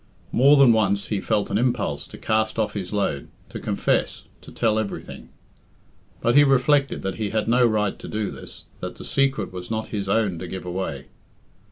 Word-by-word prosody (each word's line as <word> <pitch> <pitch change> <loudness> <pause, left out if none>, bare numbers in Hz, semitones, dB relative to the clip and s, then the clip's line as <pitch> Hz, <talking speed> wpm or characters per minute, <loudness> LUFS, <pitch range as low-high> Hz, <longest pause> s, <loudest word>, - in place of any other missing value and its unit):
More 140 +4 +6
than 135 -4 +7
once 100 -3 +1
he 105 -3 -1
felt 105 -2 0
an 105 - +1
impulse 110 - -1
to - - -11
cast 110 0 0
off 110 -2 0
his 95 -3 -5
load, 100 -9 -1 0.2
to - - -7
confess, - - -1 0.2
to - - -13
tell 110 -2 +1
everything. 110 -2 -6 0.9
But 120 - +2
he 145 - +8
reflected 140 +1 +2
that 95 -2 -3
he 105 -2 -2
had 110 0 -1
no 120 +1 +4
right 105 -3 0
to - - -9
do 105 -1 -3
this - - -11
that - - -6
the - - -9
secret 135 -9 0
was 90 -1 -7
not 110 0 -3
his 100 -3 -3
own 100 -5 +1
to 90 - -6
give 95 +1 -6
away. 90 -7 -4
110 Hz, 195 wpm, -23 LUFS, 95-120 Hz, 0.9 s, he